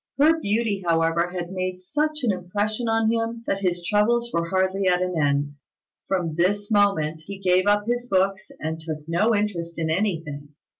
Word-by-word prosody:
Her 315 Hz, +3 st, +4 dB
beauty, 210 Hz, -5 st, 0 dB
however, 165 Hz, 0 st, +2 dB
had 175 Hz, -1 st, -5 dB
made 185 Hz, -1 st, -3 dB
such 300 Hz, +10 st, -2 dB
an 235 Hz, -, +3 dB
impression 205 Hz, +5 st, -2 dB
on 225 Hz, 0 st, +2 dB
him 230 Hz, 0 st, -2 dB
that 195 Hz, -, -1 dB
his 175 Hz, -2 st, -1 dB
troubles 235 Hz, +5 st, +2 dB
were 170 Hz, 0 st, 0 dB
hardly 190 Hz, +1 st, +1 dB
at 180 Hz, -1 st, +3 dB
an 180 Hz, 0 st, -1 dB
end. 145 Hz, -2 st, +1 dB, 0.6 s
From 180 Hz, -4 st, -1 dB
this 205 Hz, +6 st, 0 dB
moment 165 Hz, -7 st, +2 dB
he 200 Hz, 0 st, -6 dB
gave 185 Hz, 0 st, +2 dB
up 205 Hz, 0 st, +3 dB
his 240 Hz, +1 st, -1 dB
books, 195 Hz, 0 st, +1 dB
and 160 Hz, +1 st, -3 dB
took 155 Hz, -1 st, -6 dB
no 210 Hz, +7 st, +2 dB
interest 175 Hz, -5 st, -2 dB
in 160 Hz, -1 st, -1 dB
anything. 160 Hz, -6 st, -2 dB
190 Hz, 180 wpm, -24 LUFS, 170-210 Hz, 0.6 s, Her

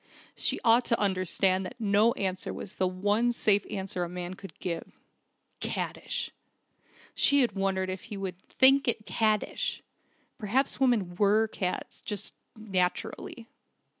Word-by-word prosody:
She -, -, 0 dB
ought 230 Hz, +2 st, +6 dB
to 230 Hz, -, +1 dB
understand 190 Hz, -1 st, +2 dB
that 185 Hz, -, -8 dB
no 215 Hz, +2 st, +3 dB
answer 190 Hz, -1 st, -2 dB
was 190 Hz, -, -8 dB
the 185 Hz, -, +2 dB
one 205 Hz, +6 st, +1 dB
safe 205 Hz, -4 st, +3 dB
answer 190 Hz, -2 st, -3 dB
a 175 Hz, -, -4 dB
man 180 Hz, 0 st, -5 dB
could 195 Hz, +1 st, -11 dB
give... 170 Hz, -2 st, -5 dB, 0.7 s
"Caddish!"... -, -, -3 dB, 0.8 s
She 285 Hz, 0 st, +4 dB
had 245 Hz, -, +2 dB
wondered 195 Hz, -1 st, -1 dB
if 185 Hz, -, -7 dB
he 210 Hz, -3 st, -7 dB
would 190 Hz, -2 st, -5 dB
"think 270 Hz, +1 st, +5 dB
it 225 Hz, -2 st, -1 dB
caddish!" 215 Hz, -1 st, 0 dB, 0.6 s
Perhaps 255 Hz, +6 st, 0 dB
women 225 Hz, -9 st, +2 dB
were 210 Hz, +2 st, +4 dB
cads 185 Hz, -4 st, -4 dB
just 210 Hz, 0 st, -3 dB, 0.2 s
naturally. 200 Hz, +3 st, -2 dB
200 Hz, 135 wpm, -29 LUFS, 185-225 Hz, 0.8 s, ought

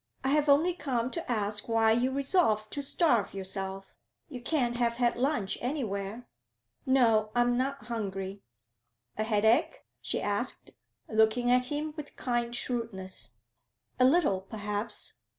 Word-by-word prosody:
'I 265 Hz, -, +1 dB
have 295 Hz, +1 st, +2 dB
only 315 Hz, +6 st, +5 dB
come 255 Hz, -7 st, -2 dB
to 335 Hz, -7 st, -4 dB
ask 210 Hz, -1 st, -1 dB
why 225 Hz, -1 st, +4 dB
you 240 Hz, +3 st, +2 dB
resolve 270 Hz, -, +2 dB
to 285 Hz, -, -3 dB
starve 270 Hz, -, +2 dB
yourself. 195 Hz, 0 st, -4 dB, 0.3 s
You 255 Hz, -5 st, -7 dB
can't 245 Hz, -3 st, 0 dB
have 235 Hz, -1 st, +1 dB
had 240 Hz, -1 st, +2 dB
lunch 245 Hz, -6 st, 0 dB
anywhere?' 230 Hz, -4 st, -3 dB, 0.6 s
'No; 225 Hz, -5 st, +4 dB
I 240 Hz, -, +4 dB
am 245 Hz, 0 st, +2 dB
not 265 Hz, -1 st, -2 dB
hungry.' 195 Hz, -4 st, -4 dB, 0.8 s
'A 215 Hz, -, +1 dB
headache?' 220 Hz, +5 st, +2 dB, 0.2 s
she -, -, -1 dB
asked, -, -, -2 dB, 0.4 s
looking 220 Hz, +3 st, +3 dB
at 250 Hz, 0 st, +4 dB
him 300 Hz, +3 st, -3 dB
with 300 Hz, -2 st, -8 dB
kind 240 Hz, -1 st, -1 dB
shrewdness. 220 Hz, -, -4 dB, 0.7 s
'A 255 Hz, -, +6 dB
little, 260 Hz, -, +3 dB
perhaps.' 210 Hz, +1 st, -4 dB
240 Hz, 140 wpm, -29 LUFS, 210-265 Hz, 0.8 s, A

